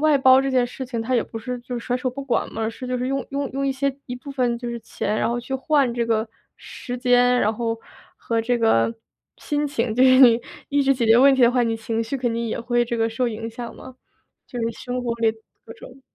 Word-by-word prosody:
外 305 Hz, -1 st, +4 dB
包 265 Hz, -1 st, +6 dB
这 270 Hz, -, -1 dB
件 255 Hz, -2 st, +2 dB
事 250 Hz, +1 st, -7 dB
情 235 Hz, -2 st, -3 dB
它 255 Hz, +3 st, 0 dB
也 235 Hz, -, +3 dB
不 225 Hz, -, -10 dB
是 245 Hz, +2 st, -4 dB
就 245 Hz, +1 st, -6 dB
甩 245 Hz, +1 st, -1 dB
手 255 Hz, 0 st, -2 dB
不 275 Hz, +2 st, -6 dB
管 245 Hz, -, 0 dB
嘛， 220 Hz, 0 st, -2 dB
是 255 Hz, +3 st, -8 dB
就 250 Hz, 0 st, -1 dB
是 250 Hz, +1 st, -2 dB
用 275 Hz, -1 st, -2 dB
用 280 Hz, 0 st, -3 dB
用 275 Hz, +1 st, -2 dB
一 270 Hz, -, +1 dB
些 275 Hz, 0 st, -1 dB
一 245 Hz, -, -5 dB
部 260 Hz, +3 st, -9 dB
分 250 Hz, -3 st, 0 dB
就 240 Hz, 0 st, -5 dB
是 235 Hz, -, -4 dB
钱， 215 Hz, -1 st, -3 dB
然 -, -, +1 dB
后 240 Hz, +1 st, -1 dB
去 240 Hz, +3 st, -9 dB
换 265 Hz, -1 st, +1 dB
这 235 Hz, -1 st, -1 dB
个 225 Hz, 0 st, 0 dB, 0.3 s
时 245 Hz, 0 st, -7 dB
间， 245 Hz, 0 st, +3 dB
然 215 Hz, -, +2 dB
后 225 Hz, 0 st, -3 dB, 0.4 s
和 230 Hz, -1 st, -1 dB
这 240 Hz, +2 st, 0 dB
个 225 Hz, -, +2 dB, 0.4 s
心 295 Hz, -1 st, -1 dB
情， 245 Hz, -5 st, -1 dB
就 250 Hz, +3 st, +4 dB
是 255 Hz, 0 st, +6 dB
你 240 Hz, -2 st, +7 dB, 0.3 s
一 285 Hz, 0 st, +2 dB
直 275 Hz, 0 st, +3 dB
解 245 Hz, -2 st, -1 dB
决 225 Hz, +1 st, +6 dB
问 275 Hz, +1 st, +6 dB
题 265 Hz, -, -1 dB
的 240 Hz, -, +6 dB
话， 250 Hz, -1 st, +2 dB
你 230 Hz, -1 st, 0 dB
情 225 Hz, 0 st, -2 dB
绪 230 Hz, +5 st, -3 dB
肯 245 Hz, -2 st, -1 dB
定 230 Hz, 0 st, -2 dB
也 220 Hz, -, -3 dB
会 240 Hz, 0 st, +1 dB
这 235 Hz, 0 st, -3 dB
个 225 Hz, 0 st, +1 dB
受 235 Hz, +3 st, -1 dB
影 225 Hz, 0 st, -4 dB
响 235 Hz, +1 st, -8 dB
嘛， 260 Hz, -1 st, -12 dB, 0.5 s
就 245 Hz, -, -7 dB
是 230 Hz, 0 st, 0 dB
生 250 Hz, +2 st, -5 dB
活 235 Hz, -1 st, -1 dB
里 225 Hz, -1 st, +3 dB, 0.3 s
各 225 Hz, -, -10 dB
种 255 Hz, +3 st, -14 dB
245 Hz, 280 characters per minute, -22 LUFS, 230-260 Hz, 0.5 s, 你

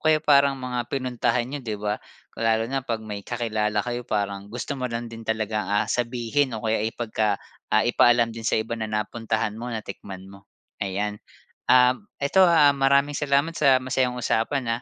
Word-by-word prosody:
kaya 155 Hz, 0 st, +5 dB
parang 140 Hz, -1 st, +4 dB
mga 125 Hz, -2 st, -3 dB
pinuntahan 125 Hz, -2 st, 0 dB
n'yo, 140 Hz, +2 st, -5 dB
'di 110 Hz, -3 st, -4 dB
ba. 105 Hz, +1 st, -2 dB, 0.3 s
Kung 115 Hz, -, -4 dB
lalo 110 Hz, 0 st, +2 dB
na 135 Hz, 0 st, -2 dB
'pag 115 Hz, -2 st, -3 dB
may 105 Hz, -2 st, -6 dB
kakilala 110 Hz, -3 st, -1 dB
kayo 120 Hz, 0 st, -3 dB
parang 100 Hz, -2 st, -3 dB
gusto 120 Hz, +5 st, -4 dB
mo 130 Hz, -2 st, -5 dB
lang 115 Hz, 0 st, -3 dB
din 115 Hz, 0 st, -9 dB
talagang, 110 Hz, -2 st, -1 dB
ah, 105 Hz, +1 st, +2 dB
sabihin 120 Hz, +3 st, 0 dB
o 110 Hz, -, -8 dB
kaya 110 Hz, -1 st, +1 dB
ipagka 110 Hz, -3 st, -1 dB, 0.3 s
ah, 110 Hz, +1 st, +5 dB
ipaalam 120 Hz, -1 st, +4 dB
din 115 Hz, -1 st, -8 dB
sa -, -, +2 dB
iba 115 Hz, +1 st, -4 dB
na 110 Hz, -1 st, -3 dB
napuntahan 110 Hz, 0 st, -2 dB
mo, 120 Hz, +2 st, -6 dB
natikman 100 Hz, -4 st, -7 dB
mo. 100 Hz, 0 st, -15 dB, 0.4 s
Ayan, 105 Hz, +2 st, -2 dB, 0.6 s
um, 125 Hz, +7 st, +5 dB, 0.2 s
ito 165 Hz, +7 st, +4 dB
ha, 160 Hz, -4 st, +6 dB
maraming 140 Hz, +1 st, +3 dB
salamat 145 Hz, +2 st, +1 dB
sa 135 Hz, -3 st, +5 dB
masayang 130 Hz, -1 st, 0 dB
usapan, 115 Hz, +1 st, 0 dB
115 Hz, 180 wpm, -24 LUFS, 110-130 Hz, 0.6 s, ha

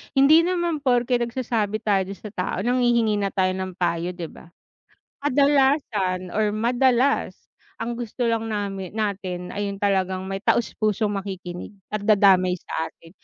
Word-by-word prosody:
Hindi 275 Hz, +4 st, +7 dB
naman 345 Hz, -3 st, 0 dB
porke 245 Hz, -2 st, +2 dB
nagsasabi 230 Hz, -3 st, -2 dB
tayo 195 Hz, -3 st, +1 dB
dun 195 Hz, -, -6 dB
sa 210 Hz, +1 st, -10 dB
tao 180 Hz, -3 st, -3 dB
nanghihingi 240 Hz, -3 st, +2 dB
na 200 Hz, -, 0 dB
tayo 190 Hz, -1 st, +1 dB
ng 185 Hz, -1 st, -4 dB
payo, 175 Hz, 0 st, -1 dB
'di 170 Hz, -3 st, -6 dB
ba? -, -, -15 dB, 0.8 s
Kadalasan 265 Hz, -, +2 dB
or 215 Hz, 0 st, +2 dB
madalas 245 Hz, +4 st, +1 dB, 0.4 s
ang 235 Hz, +1 st, -3 dB
gusto 240 Hz, +1 st, -3 dB
lang 225 Hz, -1 st, 0 dB
namin 195 Hz, -3 st, -3 dB
natin 190 Hz, -4 st, -3 dB
ay 205 Hz, 0 st, -2 dB
yung 200 Hz, -, -7 dB
talagang 190 Hz, -2 st, 0 dB
may 195 Hz, 0 st, -3 dB
taos 235 Hz, -, +2 dB
pusong 215 Hz, 0 st, +1 dB
makikinig 190 Hz, -1 st, -6 dB, 0.2 s
at 215 Hz, -, -2 dB
dadamay 195 Hz, -3 st, +4 dB
sa 165 Hz, -2 st, -4 dB
atin, 165 Hz, -, -19 dB
210 Hz, 155 wpm, -23 LUFS, 190-240 Hz, 0.8 s, Hindi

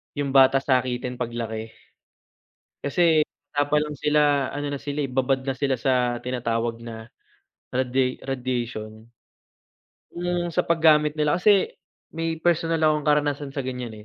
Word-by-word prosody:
'yung 140 Hz, -2 st, -2 dB
bata 135 Hz, 0 st, +6 dB
sakitin 125 Hz, -2 st, 0 dB
paglaki. 115 Hz, -2 st, -4 dB, 1.1 s
Kasi 160 Hz, +2 st, +3 dB, 0.3 s
bata 145 Hz, 0 st, +1 dB
pa 150 Hz, -, +1 dB
lang 150 Hz, -, -6 dB
sila 145 Hz, -2 st, +2 dB
ano 145 Hz, 0 st, -3 dB
na 140 Hz, -, -3 dB
sila 145 Hz, +1 st, -3 dB
eh, 135 Hz, -, -4 dB
babad 130 Hz, +1 st, +1 dB
na 135 Hz, -, -1 dB
sila 135 Hz, -1 st, 0 dB
sa 125 Hz, -1 st, +1 dB
tinatawag 115 Hz, -2 st, -2 dB
na 115 Hz, -1 st, -9 dB, 0.6 s
radia 130 Hz, 0 st, 0 dB
radiation. 120 Hz, -4 st, -4 dB, 1.1 s
'Yung 175 Hz, 0 st, -2 dB
sa 165 Hz, -, 0 dB
paggamit 155 Hz, -2 st, +4 dB
nila 150 Hz, +2 st, +1 dB
kasi 200 Hz, +1 st, +4 dB, 0.4 s
may 165 Hz, 0 st, -2 dB
personal 165 Hz, -1 st, +1 dB
akong 155 Hz, -1 st, +2 dB
karanasan 145 Hz, -1 st, +1 dB
sa 140 Hz, -, -2 dB
ganyan 125 Hz, -3 st, -5 dB
135 Hz, 135 wpm, -24 LUFS, 125-150 Hz, 1.1 s, bata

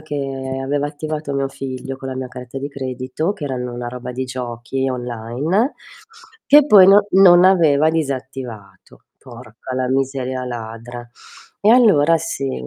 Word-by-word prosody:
che 135 Hz, -3 st, -5 dB
aveva 145 Hz, +1 st, -1 dB
attivato 150 Hz, 0 st, -5 dB
mio 135 Hz, 0 st, -1 dB
figlio 135 Hz, 0 st, -7 dB
con 135 Hz, -, -7 dB
la 130 Hz, -, -5 dB
mia 130 Hz, -1 st, -5 dB
carta 125 Hz, 0 st, -10 dB
di 140 Hz, +2 st, -5 dB
credito, 130 Hz, +6 st, -4 dB
che 150 Hz, -, -7 dB
erano 125 Hz, -3 st, -4 dB
una 120 Hz, 0 st, -5 dB
roba 125 Hz, 0 st, -7 dB
di 130 Hz, +1 st, -4 dB
giochi 125 Hz, +1 st, -4 dB
online, 125 Hz, -, -2 dB, 0.7 s
che 290 Hz, +1 st, +7 dB
poi 205 Hz, -10 st, +7 dB
no 200 Hz, +1 st, +6 dB
non 180 Hz, -2 st, +7 dB
aveva 160 Hz, -5 st, +4 dB
disattivato. 130 Hz, -, -6 dB, 0.2 s
Porca 120 Hz, 0 st, -10 dB
la 130 Hz, 0 st, -1 dB
miseria 130 Hz, -1 st, -2 dB
ladra. 120 Hz, 0 st, -8 dB, 0.5 s
E 205 Hz, -, +2 dB
allora 200 Hz, -, +5 dB
sì. 135 Hz, -, -4 dB
135 Hz, 145 wpm, -19 LUFS, 125-155 Hz, 0.7 s, che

